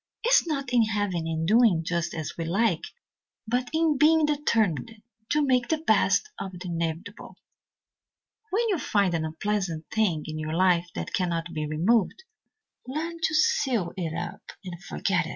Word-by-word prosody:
It 475 - +1
is - - +5
not 275 -5 -3
in 240 - +5
having 205 -6 -1
and 160 0 -2
doing 215 -6 +4
just 170 -1 -2
as 160 -2 -5
we 165 - -3
like, 185 +1 +1 0.6
but 245 +2 0
in 315 -3 +1
being 315 +1 +5
determined 225 - 0 0.3
to 295 0 +2
make 250 -2 +2
the 320 - +1
best 320 +6 +2
of 190 - -5
the 180 0 -7
inevitable. 170 +5 -4 1.1
When 460 +5 +1
you 375 -6 +1
find 200 -8 +1
an 160 -1 0
unpleasant 165 -1 -2
thing 185 -9 +1
in 155 0 -5
your 155 0 -3
life 180 -1 +3
that - - -5
cannot 170 -2 -1
be 155 -1 -2
removed, 195 - +1 0.6
learn 325 +5 -4
to 320 -1 +1
seal 270 - +2
it 165 -4 -3
up - - -5 0.2
and 175 0 -8
forget 185 -3 -1
it. - - -7
200 Hz, 170 wpm, -26 LUFS, 170-270 Hz, 1.1 s, is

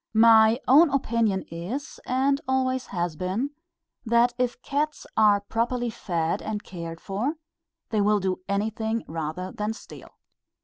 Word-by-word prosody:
My 225 +1 +6
own 295 +6 +7
opinion 230 -7 +1
is, 210 - -5
and 275 +2 +1
always 260 -1 0
has 175 -3 -2
been, 190 - -2 0.5
that 235 +1 +3
if 250 -1 0
cats 300 +2 -2
are 210 -2 +5
properly 235 +3 -1
fed 170 -6 -2
and 215 -1 -4
cared 165 -2 -7
for, 220 +11 -2 0.6
they 215 -2 +2
will 210 +1 +3
do 190 -1 -1
anything 220 +2 -1
rather 165 +3 -4
than 210 +1 -3
steal. - - -12
220 Hz, 135 wpm, -26 LUFS, 190-250 Hz, 0.6 s, own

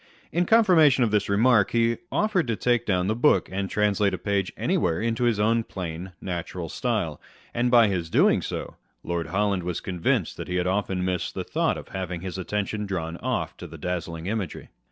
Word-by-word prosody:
In 175 +2 +1
confirmation 165 - +5
of 115 - +1
this 105 -1 +1
remark, 105 0 +4
he 115 0 +2
offered 205 -8 +1
to 115 - 0
take 120 +1 +1
down 90 -3 +1
the 105 - +1
book, 140 +6 +3
and 95 0 -2
translate 105 -2 +1
a - - -6
page 100 -2 -1
anywhere 80 -2 +1
into 115 +1 0
his 115 -3 +2
own 115 +2 +2
plain, 90 -2 -6
natural 85 -2 -5
style; - - -2 0.3
and 120 +1 +1
by 120 -2 +6
his 90 -5 -2
doing - - +4
so, - - -5 0.3
Lord 85 -1 -2
Holland 100 +1 0
was 90 -1 -3
convinced 95 +3 -1
that - - -6
he 90 - -3
had 90 -1 +1
often 95 -1 0
missed 90 -2 -2
the - - -2
thought - - 0
from - - -10
having 90 -2 -4
his 95 0 -5
attention 105 +2 -2
drawn 85 -3 -3
off - - -2
to - - -8
the - - -10
dazzling 85 -2 -4
imagery. 100 -4 -4
100 Hz, 195 wpm, -25 LUFS, 90-115 Hz, 0.3 s, by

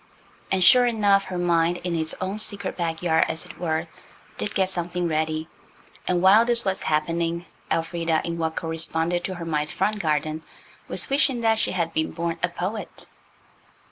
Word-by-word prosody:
And 190 -1 +2
sure 245 +7 +7
enough, 205 -4 +3
her 180 - -5
mind, 175 0 +2
in 175 -1 -1
its 160 -1 +1
own 190 +3 -3
secret 200 -2 -2
backyard, 165 -1 +1
as 160 - +1
it - - -12
were, 160 -1 -1 0.5
did 210 - -3
get 190 -2 +2
something 175 -1 -2
ready. 155 0 -1 0.6
And 180 -1 +1
while 200 +4 +7
this 235 -1 +2
was 190 -1 -1
happening 165 +2 -1 0.2
Elfrida, 165 -1 0
in 170 0 -4
what 160 -1 -1
corresponded 165 +1 +1
to 185 - -4
her 170 -1 -6
mind's 150 -2 -1
front 210 +3 0
garden, 155 -2 -1 0.5
was - - 0
wishing 275 -3 +2
that 225 -1 +2
she - - +1
had 170 -2 -1
been 160 - 0
born 170 0 -3
a 180 - +1
poet. 185 +5 -4
170 Hz, 170 wpm, -24 LUFS, 160-190 Hz, 0.6 s, sure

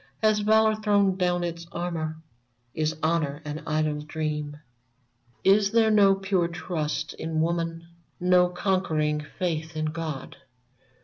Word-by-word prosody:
Has 215 -1 +4
Valor 220 +1 +4
thrown 205 -3 +2
down 180 -1 0
its 170 -1 -5
armor? 165 -2 -3 0.6
Is 155 0 -1
Honor 155 -3 0
an 150 +1 -5
idle 155 -1 0
dream? 150 -1 -3
VERMONT 120 -3 -25
11/ 195 - +7
Is 200 -1 0
there 225 -1 +4
no 200 -2 +6
pure 195 -3 0
trust 170 -3 -3
in 160 0 -3
woman? 165 0 -1 0.3
No 180 0 +4
conquering 165 -5 0 0.2
faith 160 -3 -2
in 155 - -1
God? 155 -3 -5
165 Hz, 135 wpm, -26 LUFS, 155-185 Hz, 0.6 s, 11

